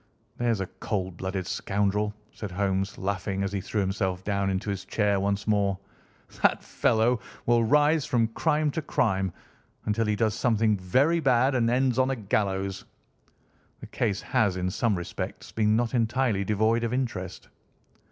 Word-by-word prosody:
"There's 115 -4 0
a - - -1
cold 95 -2 -4
blooded 95 0 -3
scoundrel!" 105 +2 -1 0.2
said 105 - -6
Holmes, 95 +1 -1
laughing, 100 0 -2
as 100 - -2
he 100 -1 -2
threw 105 +3 -2
himself 95 -1 -1
down 100 -1 0
into 95 +2 -1
his 95 -1 -4
chair 100 0 +1
once 100 +1 -1
more. 100 -3 +1 0.6
"That - - +3
fellow 115 +2 +2 0.3
will 120 -1 +4
rise 150 +5 +4
from 115 -4 +2
crime 150 +4 +1
to 160 - -2
crime 95 - 0 0.5
until 110 +1 0
he 105 - +1
does 110 0 +1
something 110 -2 +2
very 130 - +2
bad, 130 -2 +3
and 120 -3 +2
ends 130 0 +2
on 130 0 +3
a 135 - 0
gallows. 100 -3 -1 1.0
The - - -9
case 105 -5 -1
has, 100 -4 +1
in 90 0 -1
some 110 0 +1
respects, 85 - -6
been 110 -1 +2
not 120 +1 0
entirely 120 -3 +1
devoid 110 +3 +1
of 115 +1 -1
interest." 120 -8 -3
105 Hz, 160 wpm, -27 LUFS, 95-120 Hz, 1.0 s, will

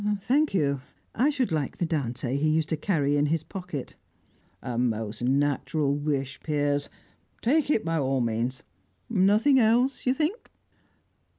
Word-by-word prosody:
"Thank 280 +5 +1
you. 140 -6 +1 0.3
I 260 +6 +2
should 265 - 0
like 150 -4 -2
the 175 - 0
Dante 130 -5 -2
he 150 +2 +1
used 155 0 +1
to - - +1
carry 145 -4 +1
in 145 +1 +2
his 160 +1 0
pocket." 180 -7 -7 0.7
"A 125 - -4
most 110 -2 -1
natural 140 +2 +1
wish, 140 -2 -2
Piers. 145 -2 -1 0.5
Take 290 +5 +2
it 225 - +1
by 165 -1 0
all 135 -1 0
means. 120 +2 -1 0.5
Nothing 215 +7 +4
else, 245 +4 +2
you 255 - +3
think?" 320 - -2
150 Hz, 150 wpm, -27 LUFS, 135-215 Hz, 0.7 s, Nothing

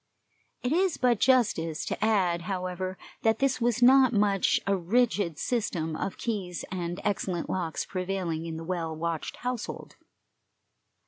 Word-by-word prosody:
It 250 - 0
is 365 +2 +2
but 245 -4 +2
justice 205 -12 +2
to - - -3
add, 185 -6 +2
however, 185 0 -3 0.2
that 225 0 +3
this 270 -2 +1
was 240 0 +2
not 260 0 +7
much, 200 -2 +3
a 200 - +2
rigid 200 -3 +1
system 175 -10 -1
of 190 - -3
keys 195 -7 -3
and 175 -1 -3
excellent 185 -4 -1
locks 170 -4 -2
prevailing 185 -3 -3
in 160 -1 -5
the 165 - -6
well 165 -2 -3
watched 165 0 -3
household. 250 -3 -4
190 Hz, 140 wpm, -28 LUFS, 170-235 Hz, 0.2 s, not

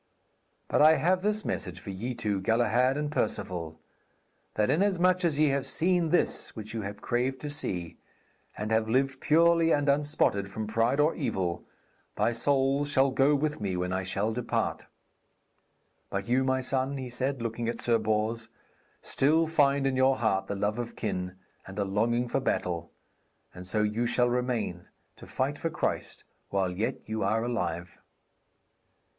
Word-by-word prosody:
But - - +2
I 155 +1 +8
have 180 +5 +2
this 210 +1 0
message 90 -1 -3
for 100 - -7
ye 120 +7 -4
two, 100 -3 -1
Galahad 120 +5 +2
and 150 0 -2
Perceval; 90 - -2 0.8
that 105 +4 +2
inasmuch 185 +1 +2
as 160 -4 +1
ye 150 -1 +4
have 135 0 -1
seen 175 +2 +1
this 175 - 0
which 110 0 -7
you 115 - -3
craved 125 +5 -1
to 150 - -4
see, 90 - -4 0.6
and 105 +1 -3
have 110 0 +2
lived 130 +2 +1
purely 165 +1 +4
and 145 -1 +2
unspotted 140 -9 +1
from 110 +3 -4
pride 115 +5 +1
or 150 +3 +4
evil, 90 -3 -2 0.5
thy - - +2
souls 135 +3 +1
shall 135 -1 +3
go 135 +3 +3
with 150 -3 -1
me 95 -3 -1
when 90 +1 -2
I 95 - 0
shall 100 +4 -1
depart. 120 0 -2 1.2
But 100 0 -3
you, 125 +2 +2
my 130 0 +1
son,' 135 +1 -1
he 130 -1 -5
said, 130 +2 -2
looking 115 0 -3
at 115 - -4
Sir 115 -1 +2
Bors, 110 +1 -1 0.5
'still 155 +4 +3
find 140 -3 +2
in 135 -1 +1
your 130 0 +3
heart 95 -4 0
the 100 - -3
love 105 +3 -1
of 120 -1 -5
kin, 90 -4 -3 0.3
and 95 +1 -9
a 100 - 0
longing 115 +5 +1
for 135 - 0
battle, 85 -9 -2 0.6
and 90 0 -9
so 105 +2 +1
you 110 +3 0
shall 125 0 +2
remain, 120 -8 -2 0.3
to - - -12
fight 140 +3 -2
for 165 - -1
Christ - - -3 0.3
while 95 -2 0
yet 110 +8 -3
you 110 0 -3
are 110 +3 +1
alive.' 90 -8 -3
120 Hz, 165 wpm, -28 LUFS, 105-140 Hz, 1.2 s, I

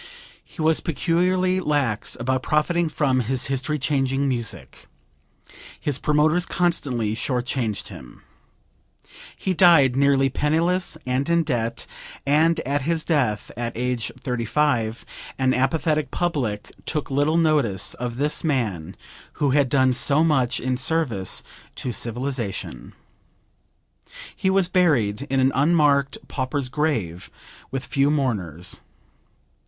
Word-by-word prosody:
He 160 - -7
was 160 0 +3
peculiarly 180 +3 +1
lax 145 - 0
about 130 +2 0
profiting 160 +4 +1
from 140 -4 +1
his 125 +1 -1
history 135 +3 -1
changing 135 -1 0
music. 110 - -4 0.9
His 145 -3 -2
promoters 155 +4 +2
constantly 135 -11 0
short 125 +2 -2
changed 115 -6 -3
him. 75 - -12 1.1
He 190 - -1
died 165 -8 +5
nearly 135 0 +3
penniless 165 +6 0
and 130 +4 -1
in 170 0 +3
debt, 120 -6 -2 0.4
and 155 +4 +3
at 140 +2 -1
his 160 +3 -1
death 125 -11 0
at 120 0 -4
age 125 -1 -1
35 120 -2 -1 0.3
an 130 -1 +2
apathetic 150 +2 +1
public 125 -13 -2 0.2
took 150 -3 -2
little 145 +4 +2
notice 145 - +1
of 120 -1 -5
this 150 +2 0
man 105 - -1 0.4
who 145 -2 0
had 140 -1 +3
done 130 -1 +3
so 140 +4 +2
much 135 -7 +1
in 130 0 -1
service 130 - -1 0.3
to 125 - -4
civilization. 120 -3 -4 1.4
He 190 - 0
was 190 -1 +3
buried 140 - +1
in 135 - +1
an 130 +1 +3
unmarked 145 -2 +3
pauper's 130 0 -2
grave 120 - -2 0.4
with 135 0 -4
few 140 +1 +1
mourners. 100 - -1
135 Hz, 120 wpm, -23 LUFS, 120-155 Hz, 1.4 s, died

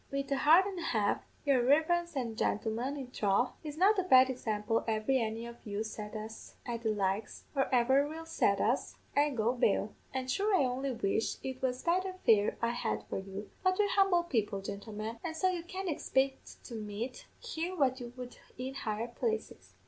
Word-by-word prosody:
"'Wid 275 0 -3
a 275 - +2
heart 325 +7 +6
an' 390 -3 -4
a 335 - -4
half, 210 -3 +1 0.2
yer 270 -4 +4
reverence 320 +5 +3
an' 235 -4 -2
gintlemen; 230 +6 -1
in 270 - -4
throth, 210 +3 +2
it's 300 -1 -6
not 395 +4 +5
a - - +2
bad 260 -7 +6
example 225 -2 -1
ever 215 +2 0
any 230 -3 0
of 235 0 -10
you 205 0 -3
set 210 0 -7
us 220 +1 -8
at 235 -1 -3
the 225 - 0
likes, 205 0 -1
or 270 - +2
ever 265 +3 +4
will 320 +2 -7
set 200 -11 +2
us, 240 +5 0 0.2
I'll 290 -1 +3
go 230 +1 +2
bail. 215 -3 +1 0.2
An' 260 -1 -3
sure 400 +9 +2
I 285 - +4
only 260 +2 -1
wish 220 -1 0
it 260 -1 -5
was 255 -1 -1
betther 370 +2 +1
fare 210 -2 +4
I 235 - +3
had 105 - -2
for - - -1
you; 195 +2 -7
but 370 0 +2
we're 415 -1 +3
humble 390 -4 +4
people, 220 -11 -1
gintlemen, 210 +3 -6
and 320 -1 -4
so 370 - +3
you 360 -2 -2
can't 375 +2 -5
expect 270 -4 -1
to 245 - -9
meet 220 +3 -5
here 365 -6 -4
what 265 -5 +2
you 240 -1 -7
would 250 -1 -8 0.2
in 260 +1 -4
higher 220 -3 -3
places.' 440 - -4
255 Hz, 200 wpm, -32 LUFS, 220-315 Hz, 0.2 s, heart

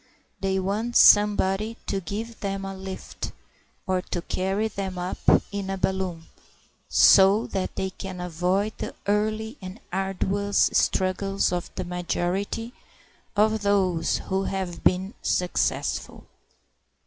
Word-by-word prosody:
They 190 -1 0
want 210 +5 -2
somebody 210 +1 +5
to 195 - -2
give 220 +6 -5
them 195 -1 -3
a 195 0 -5
lift 190 0 -7 0.5
or 185 -1 0
to 175 -1 -4
carry 195 +5 -1
them 195 -3 -5
up 180 +1 -4 0.3
in 200 -2 -4
a 195 - -2
balloon, 185 -3 -1 0.7
so 195 +3 +6
that 190 -1 -3
they 190 0 -2
can 190 -1 -7
avoid 180 +4 0
the - - -5
early 215 +4 -1
and 185 +4 -8
arduous 195 +1 +1
struggles 195 +1 +1
of 175 -1 -2
the 185 - -3
majority 180 +6 -2 0.6
of 215 +1 +3
those 185 -5 +2
who 190 0 -2
have 190 -3 -4
been 190 +3 +2
successful. 180 -1 -1
195 Hz, 125 wpm, -25 LUFS, 185-205 Hz, 0.7 s, so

